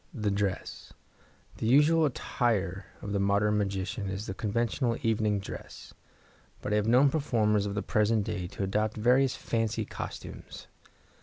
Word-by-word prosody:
The 105 Hz, -4 st, 0 dB
Dress.—The 100 Hz, +2 st, -6 dB
usual 150 Hz, +6 st, +5 dB
attire 100 Hz, -8 st, -1 dB, 0.2 s
of 100 Hz, -, -4 dB
the 100 Hz, -, 0 dB
modern 100 Hz, +2 st, +2 dB
magician 100 Hz, 0 st, -2 dB
is 95 Hz, +2 st, -4 dB
the 95 Hz, -, -4 dB
conventional 115 Hz, +3 st, -1 dB
evening 110 Hz, -2 st, +1 dB
dress, 100 Hz, -, -9 dB, 0.7 s
but 105 Hz, -, -3 dB
I -, -, +4 dB
have 105 Hz, 0 st, 0 dB
known 130 Hz, +4 st, +5 dB
performers 105 Hz, -9 st, +1 dB
of 100 Hz, -, -4 dB
the 105 Hz, -, -1 dB
present 105 Hz, 0 st, +2 dB
day 100 Hz, -4 st, -3 dB
to 95 Hz, -, -5 dB
adopt 105 Hz, +3 st, 0 dB
various 125 Hz, +4 st, +3 dB
fancy 115 Hz, -2 st, -1 dB
costumes. -, -, -8 dB
105 Hz, 145 wpm, -29 LUFS, 100-115 Hz, 0.7 s, usual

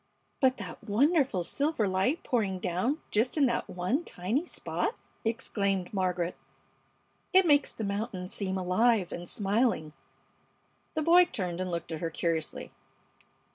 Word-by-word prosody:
"But 260 Hz, -1 st, +3 dB
that 200 Hz, -4 st, -8 dB
wonderful 255 Hz, -, +2 dB
silver 280 Hz, -, 0 dB
light 190 Hz, -, +1 dB
pouring 205 Hz, -6 st, 0 dB
down 185 Hz, -, -1 dB
just 230 Hz, +8 st, +1 dB
in 290 Hz, -, +5 dB
that 240 Hz, -2 st, -1 dB
one 185 Hz, -, -1 dB
tiny 225 Hz, -, -2 dB
spot!" 455 Hz, -, -2 dB, 0.3 s
exclaimed 200 Hz, -4 st, -1 dB
Margaret. 180 Hz, -2 st, 0 dB, 1.0 s
"It 375 Hz, 0 st, +7 dB
makes 290 Hz, -3 st, +4 dB
the 225 Hz, -, -6 dB
mountain 200 Hz, -2 st, -3 dB
seem 190 Hz, 0 st, -2 dB
alive 190 Hz, +2 st, +2 dB
and 175 Hz, 0 st, -6 dB
smiling!" 200 Hz, -6 st, 0 dB, 1.0 s
The 310 Hz, -, 0 dB
boy 350 Hz, +3 st, +7 dB
turned 180 Hz, -, -4 dB
and 185 Hz, -, -2 dB
looked 170 Hz, -1 st, -4 dB
at 160 Hz, -, -4 dB
her 165 Hz, -, -1 dB
curiously. 165 Hz, -1 st, -2 dB
200 Hz, 135 wpm, -29 LUFS, 180-260 Hz, 1.0 s, It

